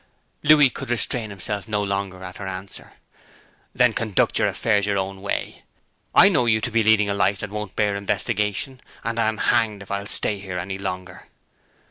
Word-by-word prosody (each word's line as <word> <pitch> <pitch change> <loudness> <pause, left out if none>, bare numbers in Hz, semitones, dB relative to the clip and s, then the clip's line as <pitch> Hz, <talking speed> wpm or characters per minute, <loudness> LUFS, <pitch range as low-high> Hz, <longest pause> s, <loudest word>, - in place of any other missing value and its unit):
Louis 145 -3 +6
could 135 - -7
restrain 120 -1 -1
himself 100 +1 -4
no 105 -2 -1
longer 100 -2 -3
at 90 -1 -8
her 95 - -6
answer. 95 +1 -6 0.8
'Then 125 -2 +4
conduct 110 -4 +1
your - - +3
affairs 105 -3 +1
your 100 -1 +1
own 95 0 -3
way. 100 - -3 0.5
I - - +9
know 150 -11 +2
you 110 -1 +4
to 120 +3 -3
be 115 0 +3
leading 110 -1 +4
a 100 - 0
life 100 0 +2
that 110 - -5
won't 105 -1 -5
bear 105 -2 +1
investigation, 105 +5 -1 0.2
and 115 0 -2
I'm 110 -1 +1
hanged 110 -4 +1
if 100 - -12
I'll 100 0 -3
stay 105 -1 +2
here 95 -2 -6
any 95 +2 -4
longer!' 90 -1 -6
105 Hz, 185 wpm, -23 LUFS, 100-115 Hz, 0.8 s, I